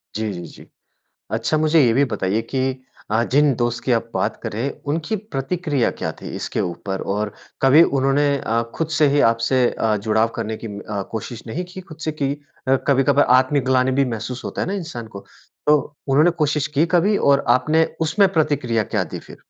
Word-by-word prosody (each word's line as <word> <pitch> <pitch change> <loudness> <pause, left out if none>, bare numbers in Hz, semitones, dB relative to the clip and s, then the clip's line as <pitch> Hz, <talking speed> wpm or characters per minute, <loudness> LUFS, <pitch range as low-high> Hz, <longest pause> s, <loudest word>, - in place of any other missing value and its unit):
जी, 110 -1 -2
जी, 85 -1 -7
जी, - - -14 0.7
अच्छा 115 +7 0
मुझे 155 +1 +4
ये 115 - +3
भी 140 +3 +4
बताइये 105 -2 -1
की 130 0 -1 0.3
अ, 110 +2 +2
जिन 145 -1 +4
दोस्त 120 -1 -1
की 125 - +1
आप 115 0 0
बात - - -1
कर - - -4
रहे 110 +3 -3
हैं 140 - -1 0.2
उनकी 165 +7 -2
प्रतिक्रिया 155 - -1
क्या - - -1
थी - - -7
इसके - - -3
ऊपर 95 +2 -3
और 105 0 -2 0.3
कभी 140 +5 +7 0.2
उन्होंने 135 +2 +2
अ, 115 +1 0
खुद 165 -1 -2
से 150 - +5
ही 145 - +4
आपसे 115 +3 +1
अ, 110 -1 0
जुड़ाव 110 +2 +1
करने 110 -2 -3
की - - -3
अ, 100 0 -5
कोशिश 115 +1 -5
नहीं 165 +11 -4
की 190 - -7
खुद 175 -5 -13
से 155 - -1
की 140 -2 -1 0.4
अ, 135 - +5
कभी-कभार 140 +1 +4
आत्मग्लानि 130 -1 +2
भी 140 - +4
महसूस 120 +3 -6
होता - - -4
है - - -1
ना 190 - -2
इंसान 165 - -5
को। - - -6 0.5
तो 150 0 +6 0.3
उन्होंने 150 +6 +5
कोशिश 150 -1 +1
की 160 - +4
कभी 200 +4 +3
और 140 0 +3
आपने 155 +5 +2 0.2
उसमें 160 +5 +3
प्रतिक्रिया 140 -8 +1
क्या 105 -5 +1
दी 80 - -7
फिर? - - -13
130 Hz, 200 wpm, -21 LUFS, 115-150 Hz, 0.7 s, कभी